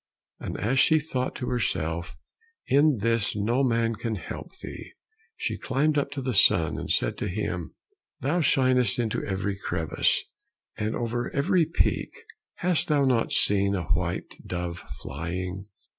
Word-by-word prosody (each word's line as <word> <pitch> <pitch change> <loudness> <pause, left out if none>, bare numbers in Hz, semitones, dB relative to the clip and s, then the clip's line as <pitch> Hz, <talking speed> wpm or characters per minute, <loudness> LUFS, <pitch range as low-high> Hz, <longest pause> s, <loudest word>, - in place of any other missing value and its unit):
And - - -5
as 125 +7 +1
she 160 +3 +5
thought 130 -4 -3
to 125 - -3
herself, 85 -10 -2 0.5
"In 145 +1 +4
this 115 -1 +1
no 115 +6 +1
man 115 -2 +2
can 115 0 -3
help 95 - -8
thee," - - -9 0.4
she - - -2
climbed 150 +3 +1
up 145 -1 +1
to 135 -2 -4
the 130 -1 -1
sun, 85 -5 +4
and - - -6
said - - +1
to - - -2
him, 90 -3 -3 0.4
"Thou 160 +7 +1
shinest 130 -4 +3
into 115 -3 -1
every 100 0 -2
crevice, - - 0 0.5
and 110 0 -2
over 120 0 -2
every 165 +3 +3
peak, 165 - 0 0.4
hast 180 -2 +1
thou 145 -3 +3
not 125 -3 +2
seen 100 0 +3
a 90 -4 -4
white - - -1
dove 90 -1 -4 0.2
flying?" 90 +6 -4
115 Hz, 150 wpm, -26 LUFS, 95-135 Hz, 0.5 s, she